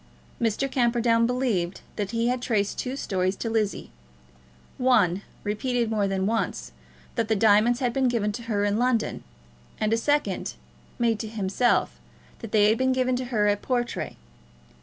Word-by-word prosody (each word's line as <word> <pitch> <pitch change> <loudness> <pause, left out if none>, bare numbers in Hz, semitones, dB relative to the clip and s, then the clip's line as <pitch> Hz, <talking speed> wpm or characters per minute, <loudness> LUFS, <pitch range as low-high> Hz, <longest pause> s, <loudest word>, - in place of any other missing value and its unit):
Mr. 230 +4 +1
Camperdown 235 -2 +2
believed 230 -9 -1
that 205 -2 -2
he 230 +1 0
had 250 0 -1
traced 210 -5 0
two 255 +1 -3
stories 185 -7 -1
to 225 +3 -4
Lizzie, 215 -3 -1 0.9
one, 215 -8 +3 0.2
repeated 235 +2 -1
more 210 -2 +1
than 190 -1 -1
once, 225 +2 -2 0.4
that 230 -2 -1
the 220 - +2
diamonds 220 +4 +4
had 245 -2 0
been 265 0 +2
given 225 -4 0
to 210 - -6
her 205 -2 +1
in 205 0 +1
London, 245 -2 0 0.6
and 215 +1 +1
a - - +3
second, 290 +5 0 0.4
made 230 -3 +1
to 220 - -4
himself, 215 +2 0 0.4
that 225 - -8
they 210 -1 +5
had 220 - +2
been 260 0 +2
given 255 0 +1
to 255 +1 -3
her 225 -4 0
at 205 0 +1
Portray. 240 -2 -2
230 Hz, 165 wpm, -26 LUFS, 205-245 Hz, 0.9 s, they